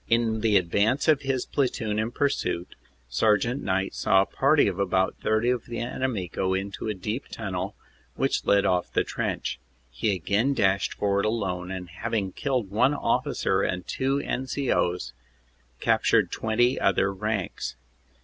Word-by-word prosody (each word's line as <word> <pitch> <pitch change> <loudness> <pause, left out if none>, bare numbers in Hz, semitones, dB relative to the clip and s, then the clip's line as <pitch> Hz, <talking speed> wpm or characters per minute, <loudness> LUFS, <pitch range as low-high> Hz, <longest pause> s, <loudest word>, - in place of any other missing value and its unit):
In 115 -1 +2
the 110 -2 +4
advance 100 - +1
of 150 -3 +4
his 135 -2 -1
platoon 110 -6 -1
in 110 +1 0
pursuit, 120 -9 -1 0.3
Sergt. 110 - +2
Knight 95 +1 -1
saw 95 0 +3
a - - -6
party 140 +4 +3
of 95 -1 -2
about 95 -1 +1
30 110 +3 +2
of 125 -2 -2
the 120 -1 -5
enemy 120 -5 -2
go 95 +2 -1
into 100 +3 -4
a 105 - -1
deep 105 +8 -4
tunnel 95 -5 -4 0.4
which - - 0
led 100 -1 +3
off 90 -1 +1
the - - +2
trench. - - -3 0.3
He - - 0
again 105 - +1
dashed 95 -3 +1
forward 100 0 +1
alone 95 -5 -2
and 95 -1 -5
having 100 +2 -2
killed 125 -4 -2
one 125 +7 +3
officer - - 0
and 90 -1 -2
two 135 +1 0
N. 130 -1 -3
C. 135 0 -1
O 90 - +2
s, 80 -8 -7 0.7
captured - - +3
twenty 120 +3 +1
other 95 0 +2
ranks. 105 - -3
105 Hz, 160 wpm, -26 LUFS, 95-120 Hz, 0.7 s, the